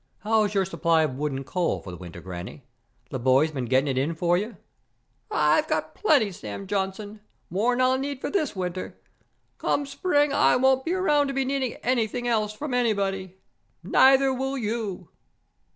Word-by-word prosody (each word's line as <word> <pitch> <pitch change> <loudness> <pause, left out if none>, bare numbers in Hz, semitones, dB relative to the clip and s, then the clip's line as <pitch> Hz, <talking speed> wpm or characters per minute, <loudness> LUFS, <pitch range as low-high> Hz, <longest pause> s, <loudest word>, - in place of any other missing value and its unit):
How's 210 -1 +1
your 195 -1 +3
supply 165 -3 +2
of 150 -4 -1
wood 150 +2 -2
and 135 0 -5
coal 180 +3 -1
for 95 - -9
the - - -7
winter, 85 -1 -10
Granny? 95 - -8 0.5
The 130 - -3
boys 130 +5 +3
been 130 -4 -3
getting 130 +4 +2
it 130 -2 0
in 155 +5 -1
for 175 +1 +2
you?" 210 +6 -3 0.7
"I - - +3
got - - -2
plenty, 280 - +2
Sam 110 - -7
Johnson. 205 +2 -3 0.3
More'n 235 +7 +1
I'll 255 +1 +3
need 280 0 -4
for - - -4
this 310 - -1
winter. 185 -1 -4 0.6
Come 285 - 0
spring, 290 0 +1
I - - +4
won't 265 +1 +3
be 340 - 0
around 295 -6 +2
to 275 - -3
be 270 -1 +1
needing 265 -2 -1
anything 245 -1 0
else 215 -3 +1
from 265 +6 -5
anybody. 195 -6 -1 0.5
Neither 270 0 +5
will 265 +1 -2
you!" 210 -6 -3
210 Hz, 175 wpm, -25 LUFS, 165-265 Hz, 0.7 s, Neither